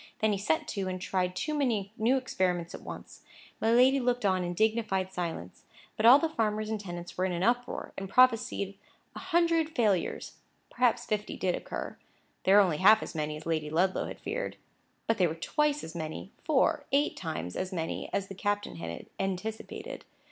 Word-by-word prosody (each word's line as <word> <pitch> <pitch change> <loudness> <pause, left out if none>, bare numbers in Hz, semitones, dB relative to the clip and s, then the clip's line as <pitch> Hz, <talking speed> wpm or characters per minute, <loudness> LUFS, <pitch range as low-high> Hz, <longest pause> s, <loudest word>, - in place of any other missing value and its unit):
Then 220 0 +2
he 200 - -1
set 160 -5 0
to, 195 -2 -2
and 185 0 -3
tried 180 -1 -1
too 305 +12 -2
many 225 -9 0
new 235 +4 +2
experiments 180 -9 -1
at - - -8
once. - - -9 0.4
My 225 - +2
lady 255 +3 +5
looked 245 -2 0
on 185 -2 +2
in 175 0 -3
dignified 210 -3 +1
silence; 165 - -5 0.3
but 220 - +3
all 250 +3 +10
the 325 - +1
farmers 215 -6 -1
and 220 - -1
tenants 175 -3 -7
were 185 - 0
in 190 - -1
an 175 0 -2
uproar, 245 +3 0
and 195 -1 -6
prophesied 230 -5 +3 0.4
a - - -6
hundred 330 -2 +1
failures. 205 -7 0 0.3
Perhaps 245 -2 +2
fifty 210 -1 -2
did 185 -1 0
occur; - - -5 0.5
they 190 - +5
were 205 - +9
only 175 -6 +1
half 215 +6 +6
as - - -7
many 150 -1 -2
as 155 - -11
Lady 155 -2 -1
Ludlow 180 +5 +1
had - - -8
feared; - - -4 0.5
but 225 -1 0
they 180 - +5
were 160 - -4
twice 295 - 0
as 160 - -7
many, 160 +3 -6
four, 300 0 +2
eight 285 +2 +2
times 155 - -5
as 185 +1 -3
many 165 -3 -3
as 195 -1 -1
the 195 - -8
captain 205 - -2
had 85 0 -6
anticipated. 195 +3 -4
200 Hz, 190 wpm, -29 LUFS, 180-240 Hz, 0.5 s, all